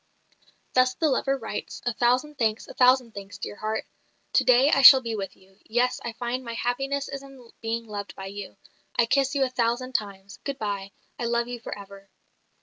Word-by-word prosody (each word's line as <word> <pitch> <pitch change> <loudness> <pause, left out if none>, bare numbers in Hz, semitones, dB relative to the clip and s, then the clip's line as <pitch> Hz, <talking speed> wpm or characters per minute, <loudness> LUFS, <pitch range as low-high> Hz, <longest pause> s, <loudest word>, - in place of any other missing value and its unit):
Thus 255 0 +3
the 315 -1 +1
lover 275 +1 +1
writes, 225 -4 -6
"A 245 - 0
thousand 255 +6 +1
thanks, 220 -2 0
a - - -10
thousand 250 -2 +4
thanks, 200 -1 -9
dear 200 - -6
heart! 215 +1 -3 0.5
To - - +4
day 255 +3 +5
I 275 - +4
shall 265 0 +11
be 230 -2 -3
with 195 -2 -5
you. 190 +1 -24
Yes, 245 +3 0
I 235 - -4
find 245 +2 -3
my 235 -1 -6
happiness 275 +4 -1
is 275 0 -6
in 270 -4 -14
being 230 +1 -2
loved 205 -2 -6
by 195 - -7
you. 200 0 -8 0.4
I 235 - +5
kiss 275 +3 +1
you 275 - +3
a 260 - +1
thousand 250 +1 0
times! 200 -4 -4
Good 280 -1 -4
bye. 200 -4 -4 0.3
I 240 - -2
love 235 0 0
you 245 0 -6
for 230 - -6
ever." 200 0 -12
235 Hz, 205 wpm, -26 LUFS, 205-260 Hz, 0.5 s, shall